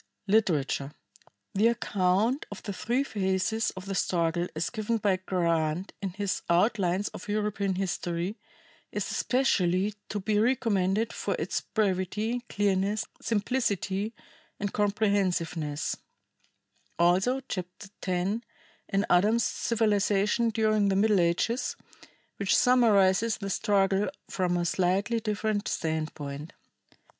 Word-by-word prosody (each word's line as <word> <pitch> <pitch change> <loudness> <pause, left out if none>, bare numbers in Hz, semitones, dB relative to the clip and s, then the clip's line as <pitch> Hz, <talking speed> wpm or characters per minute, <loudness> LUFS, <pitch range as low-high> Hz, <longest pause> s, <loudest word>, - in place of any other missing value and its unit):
Literature. 155 -9 +1 0.6
The 210 +3 +4
account 210 +2 +1
of 205 - -9
the 200 - -4
three 240 +7 0
phases 200 0 0
of 185 - -7
the 195 - -3
struggle 170 -2 0
as 160 - -2
given 225 0 -1
by 200 -3 +1
Grant 170 -2 -1
in 195 - -2
his 200 -1 -2
"Outlines 185 +1 +2
of - - -10
European 205 -2 -1
History," 180 0 -2 0.6
is - - -3
especially 200 -6 +1 0.2
to 205 - -2
be 205 +2 +1
recommended 220 -3 +1
for - - -2
its - - -2
brevity, 210 +3 -1
clearness, 200 +1 +1 0.2
simplicity 210 -2 -1 0.4
and 205 -1 -3
comprehensiveness; 185 -7 0 1.0
also 185 +10 +3
Chapter 185 +2 -6
X 185 +4 0 0.5
in 195 0 +1
Adams's 215 +6 +3
"Civilization 210 0 +1
During 215 -2 +2
the 195 - +1
Middle 205 0 +4
Ages," 175 +8 +1 0.6
which 200 -1 +2
summarizes 225 -3 +4
the 195 -2 -4
struggle 195 -1 +2 0.2
from 180 -2 0
a 175 - 0
slightly 190 +6 +1
different 215 -1 -1
standpoint. 155 -1 -3
200 Hz, 115 wpm, -28 LUFS, 180-215 Hz, 1.0 s, The